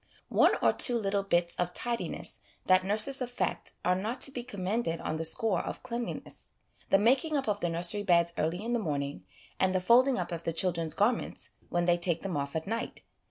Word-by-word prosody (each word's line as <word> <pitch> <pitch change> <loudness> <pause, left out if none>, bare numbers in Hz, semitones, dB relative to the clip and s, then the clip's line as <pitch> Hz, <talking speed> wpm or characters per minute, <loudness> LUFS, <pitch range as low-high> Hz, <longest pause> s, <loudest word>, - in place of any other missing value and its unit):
One - - +4
or - - +4
two 245 -2 +5
little 200 -2 0
bits 175 -3 0
of 180 0 -2
tidiness 240 -1 -3 0.3
that 185 0 +4
nurses 220 +8 +1
affect 245 -8 -3
are 180 - +3
not 215 +7 -3
to 275 - +4
be 245 -2 -5
commended 195 -4 -2
on 155 - -3
the 165 - -3
score 190 +4 +3
of - - -7
cleanliness: 240 -1 -6 0.4
the 195 - +5
making 265 +9 +2
up 275 - -3
of 205 -1 0
the 175 - -1
nursery 175 +5 +2
beds 170 -3 +3
early 165 +6 -2
in 240 - -2
the 240 - +1
morning, 140 - -4 0.3
and 190 0 +2
the - - +3
folding 245 +7 +4
up - - -3
of 170 -1 -4
the 165 - -3
children's 165 -2 0
garments 220 +4 0 0.2
when 175 0 0
they 175 0 +3
take 170 -1 -1
them 195 -3 -3
off 140 0 -3
at 160 - -2
night. 225 +3 -4
190 Hz, 205 wpm, -29 LUFS, 170-235 Hz, 0.4 s, two